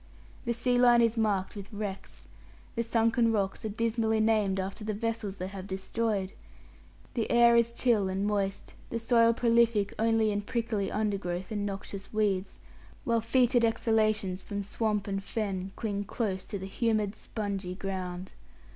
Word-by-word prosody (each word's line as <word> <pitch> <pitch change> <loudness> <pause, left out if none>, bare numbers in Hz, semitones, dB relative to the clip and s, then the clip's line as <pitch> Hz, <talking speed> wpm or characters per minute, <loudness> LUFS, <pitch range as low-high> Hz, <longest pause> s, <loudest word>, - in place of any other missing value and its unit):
The 235 - +1
sea 245 +1 +1
line 240 -1 +6
is 230 0 +2
marked 210 -4 0
with 200 -1 -8
wrecks. 205 -2 -6 0.5
The 230 - +1
sunken 230 0 +2
rocks 195 -3 -1
are - - -1
dismally 225 0 0
named 215 -3 +2
after 195 +3 -4
the 215 -1 -2
vessels 225 -2 -2
they 185 - -4
have 195 -1 -7
destroyed. 195 0 -2 0.8
The 230 -3 -1
air 235 0 +6
is 235 0 +4
chill 230 -5 +2
and 190 +2 -1
moist, 200 -2 -1 0.2
the 230 - -2
soil 230 0 +4
prolific 230 -3 +3
only 225 -1 +3
in 205 0 -1
prickly 220 -2 -2
undergrowth 195 -3 -2
and 205 -1 -1
noxious 195 0 -6
weeds, 205 -3 0 0.5
while 230 -1 +1
foetid 240 +1 +3
exhalations 215 -4 +1
from 200 +1 -4
swamp 210 0 -1
and 195 -1 -2
fen 195 -4 -3
cling 205 -3 -3
close 190 -4 -2
to 205 - -4
the 190 - -6
humid, 215 0 0
spongy 200 -5 -4
ground. 185 -1 -5
215 Hz, 155 wpm, -29 LUFS, 195-230 Hz, 0.8 s, line